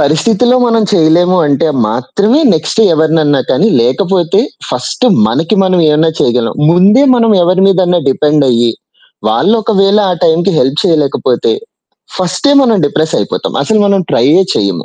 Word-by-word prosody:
పరిస్థితిలో 215 - +1
మనం 230 -2 +1
చేయలేము 175 +1 +2
అంటే 145 +2 0 0.2
మాత్రమే 200 - -1
నెక్స్ట్ 155 +7 -2
ఎవరినన్నా 155 -3 +1
కానీ 190 +12 +1
లేకపోతే 175 - 0 0.3
ఫస్ట్ 255 - -3 0.2
మనకి 170 +6 -1
మనం 185 -1 0
ఏమన్నా 155 +2 +1
చేయగలం. 120 -1 0 0.2
ముందే 195 +9 +3
మనం 230 -2 +1
ఎవరి 185 +2 +1
మీదన్న 180 -2 +1
డిపెండ్ 150 +2 +1
అయ్యి, 120 -1 0 0.6
వాళ్ళు 220 - +1
ఒకవేళ 200 -1 +1
ఆ - - 0
టైమ్‍కి 170 +4 +1
హెల్ప్ 135 +3 0
చేయలేకపోతే 165 - -1 0.7
ఫస్టే 185 +9 -1
మనం 230 -5 +1
డిప్రెస్ 155 +2 -2
అయిపోతాం. - - -4
అసలు 220 -1 0
మనం 200 -1 +1
ట్రైయ్యే 150 +11 +2
చెయ్యము. 95 -5 -2
175 Hz, 135 wpm, -10 LUFS, 150-200 Hz, 0.7 s, ముందే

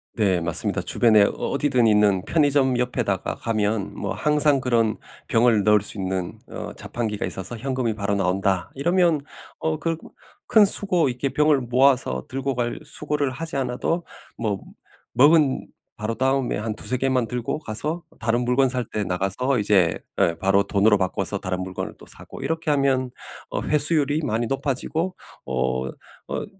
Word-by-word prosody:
네. 95 -5 +1
맞습니다. 85 0 0
주변에 110 -3 +4
어 - - +3
어디든 135 -4 0
있는 105 -3 +3
편의점 140 -5 +2
옆에다가 120 -6 -1
가면 110 -2 -1
뭐 - - -3
항상 150 -2 +2
그런 115 -4 +1 0.3
병을 115 -2 +3
넣을 105 0 +4
수 105 - +2
있는 95 -2 -3
어 - - -7
자판기가 110 -3 -4
있어서 95 +5 -6
"현금이 125 -3 -2
바로 100 -1 -1
나온다." 95 -1 0
이러면 170 +1 +2 0.4
어 160 -1 -2
그 165 -1 -2 0.5
큰 215 -2 +7
수고 180 -7 +7
이렇게 125 +3 -2
병을 150 -1 +2
모아서 125 - +2
들고 135 0 -3
갈 120 -1 -2
수고를 150 -2 -2
하지 160 +4 -6
않아도 135 +6 -1 0.3
뭐 105 -4 -2 0.5
먹은 145 +2 +4 0.3
바로 110 +2 -3
다음에 135 0 0
한 110 0 -3
2-3 125 +3 -2
개만 130 -2 0
들고 125 +5 -3
가서 150 +7 -4 0.2
다른 120 +2 0
물건 130 +2 +3
살 125 -1 -2
때 105 - -3
나가서 100 +8 -1
이제 100 -5 +2 0.2
예, 85 - +2
바로 95 +2 +3
돈으로 105 +1 +3
바꿔서 95 -1 -2
다른 95 0 -3
물건을 95 0 -5
또 - - -15
사고 - - -11
이렇게 160 -1 -1
하면 135 -3 +1 0.4
어 - - -2
회수율이 150 0 +2
많이 115 0 -1
높아지고 150 +7 -2 0.3
어 65 0 -1 0.4
어 - - -4
125 Hz, 315 characters per minute, -23 LUFS, 105-140 Hz, 0.5 s, 큰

